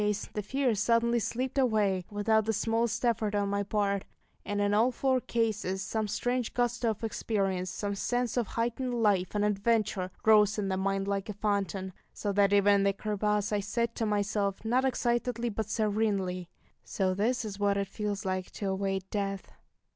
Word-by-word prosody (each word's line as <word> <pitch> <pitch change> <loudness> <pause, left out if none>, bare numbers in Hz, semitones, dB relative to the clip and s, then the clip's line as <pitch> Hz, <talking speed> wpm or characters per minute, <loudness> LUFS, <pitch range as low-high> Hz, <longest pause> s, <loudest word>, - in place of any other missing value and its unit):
Yet - - +1
in - - +2
that 210 - +3
last 205 - -5
case - - -8
the 210 - -2
fear 265 +3 0
suddenly 230 +3 +2
slipped 255 +4 -3
away, 210 -7 +2
without 215 +1 +2
the 225 - +1
smallest 225 +2 0
effort 215 -3 +1
on 200 -1 +1
my 200 0 0
part; 200 -1 0 0.4
and 205 0 -2
in 205 0 +2
all 225 +5 +4
four 260 +1 +1
cases 210 -6 -1
some 215 +2 -2
strange 245 +3 -1
gusto 240 -1 +1
of 220 +1 -4
experience, 195 -4 -1
some 200 +2 -3
sense 245 +3 -1
of 240 -4 0
heightened 240 +2 -2
life 195 -2 +2
and 205 0 +2
adventure, 210 -2 +1 0.2
rose 215 -1 +5
in 200 -2 -1
the 190 - 0
mind 195 +1 -1
like 200 0 -2
a - - -2
fountain 200 -2 -2 0.2
so 205 - -2
that 200 0 +3
even 205 0 +5
in 195 - +2
the 200 0 +3
crevasse 210 0 -1
I 205 - +2
said 235 +3 -1
to 225 - -1
myself, 205 -1 -1
not 250 +4 +2
excitedly 240 -1 0
but 215 -1 -3
serenely, 200 -5 0 0.3
"So 190 -2 0
this 225 +5 0
is 205 -2 -6
what 200 -1 +2
it 200 0 -1
feels 205 0 -4
like 185 -1 -2
to 200 - -3
await 190 0 -2
death!" 195 -2 -3
210 Hz, 195 wpm, -30 LUFS, 200-230 Hz, 0.4 s, rose